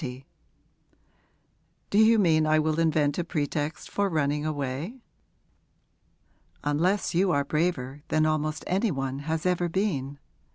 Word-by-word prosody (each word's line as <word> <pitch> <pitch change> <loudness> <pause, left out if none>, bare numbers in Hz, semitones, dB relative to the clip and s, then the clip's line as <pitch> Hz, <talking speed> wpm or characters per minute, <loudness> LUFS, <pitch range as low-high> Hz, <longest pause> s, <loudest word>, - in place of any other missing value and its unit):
'Do 205 - +3
you 220 +1 +6
mean 160 -6 +3
I 155 0 +4
will 155 +1 +1
invent 155 -3 +2
a - - +1
pretext 150 -1 -3
for 200 -1 0
running 150 -2 0
away?' 145 - -4 1.6
'Unless 170 +9 +1
you 185 +3 +2
are 140 -3 +1
braver 145 -3 -1
than 155 0 +2
almost 155 0 -1
any 195 +5 +1
one 135 -4 -3
has 160 +3 -3
ever 180 -1 +1
been. 155 -8 -1
155 Hz, 125 wpm, -27 LUFS, 145-180 Hz, 1.6 s, you